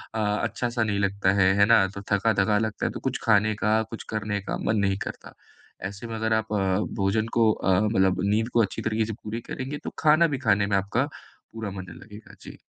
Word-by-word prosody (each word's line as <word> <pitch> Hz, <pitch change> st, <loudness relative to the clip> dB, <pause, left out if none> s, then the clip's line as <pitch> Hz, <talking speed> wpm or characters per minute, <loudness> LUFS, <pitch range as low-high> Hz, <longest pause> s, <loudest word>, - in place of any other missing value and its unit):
अ, -, -, -1 dB
अच्छा-सा 115 Hz, +3 st, -1 dB
नहीं 105 Hz, -2 st, -1 dB
लगता 100 Hz, -1 st, +1 dB
है, 95 Hz, 0 st, +5 dB
है 100 Hz, -, +7 dB
ना? 105 Hz, -3 st, +5 dB
तो 100 Hz, +1 st, -8 dB
थका-थका 100 Hz, 0 st, +2 dB
लगता 110 Hz, -1 st, -2 dB
है, -, -, -3 dB
तो -, -, -6 dB
कुछ 130 Hz, -1 st, -3 dB
खाने 110 Hz, -1 st, +3 dB
का, 110 Hz, +1 st, +2 dB
कुछ 115 Hz, -, -7 dB
करने 105 Hz, -1 st, -2 dB
का -, -, -4 dB
मन 110 Hz, -, +1 dB
नहीं 95 Hz, 0 st, 0 dB
करता। -, -, -9 dB, 0.6 s
ऐसे 100 Hz, +4 st, -9 dB
में 115 Hz, -, -5 dB
अगर 110 Hz, 0 st, 0 dB
आप 110 Hz, -1 st, -1 dB
अ, -, -, +1 dB, 0.4 s
भोजन 110 Hz, +3 st, +1 dB
को 110 Hz, -1 st, +5 dB
अ, 95 Hz, -3 st, +1 dB
मतलब 95 Hz, -3 st, +2 dB
नींद 110 Hz, +4 st, +1 dB
को 120 Hz, -, +4 dB
अच्छी 100 Hz, -, -2 dB
तरीके 110 Hz, 0 st, 0 dB
से 110 Hz, -, -4 dB
पूरी 110 Hz, +2 st, -5 dB
करेंगे, 135 Hz, +3 st, -4 dB
तो -, -, -4 dB
खाना 155 Hz, +2 st, +5 dB
भी 145 Hz, -4 st, -2 dB
खाने 100 Hz, -1 st, +3 dB
में 100 Hz, -1 st, +2 dB
आपका 100 Hz, +7 st, 0 dB, 0.5 s
पूरा 110 Hz, -3 st, -5 dB
मन 95 Hz, -1 st, -7 dB, 0.2 s
लगेगा। 105 Hz, 0 st, -13 dB
जी। -, -, -11 dB
110 Hz, 220 wpm, -25 LUFS, 100-115 Hz, 0.6 s, है